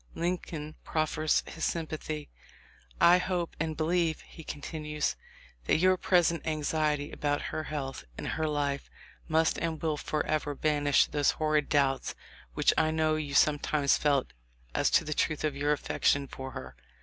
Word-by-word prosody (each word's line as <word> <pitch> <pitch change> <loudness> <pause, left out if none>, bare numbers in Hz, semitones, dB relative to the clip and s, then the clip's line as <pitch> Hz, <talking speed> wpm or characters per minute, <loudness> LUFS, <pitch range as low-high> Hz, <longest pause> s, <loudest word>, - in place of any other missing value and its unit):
Lincoln 165 -3 -3
prof 155 -1 0
fers 155 0 +1
his 165 - -7
sympathy. 155 -2 -3 0.7
"I 175 +1 +7
hope 180 -2 -2
and 160 -1 -2
believe," 165 0 +1
he 160 - -13
con 145 - -7
tinues, 150 -1 -2 0.5
"that - - +3
your 185 +3 +4
present 175 -3 +2
anxiety 150 -1 0
about 145 -1 -1
her 155 - -2
health 140 - -4
and - - -4
her 160 - -1
life 145 -2 -1 0.4
must 160 0 +2
and 165 -2 -2
will 155 -2 -1
forever 150 -1 -1
banish 145 -1 +3
those 145 -1 +1
horrid 155 -2 +1
doubts 135 -2 +1 0.4
which - - +4
I 160 0 +3
know 155 0 +2
you 145 -2 -3
sometimes 145 -1 +3
felt 140 -3 +1 0.4
as - - +2
to - - +4
the 155 - -2
truth 155 0 0
of 150 -2 0
your 145 +1 +1
affection 140 -1 +1
for 130 0 -7
her. 65 0 -8
155 Hz, 160 wpm, -30 LUFS, 145-160 Hz, 0.7 s, I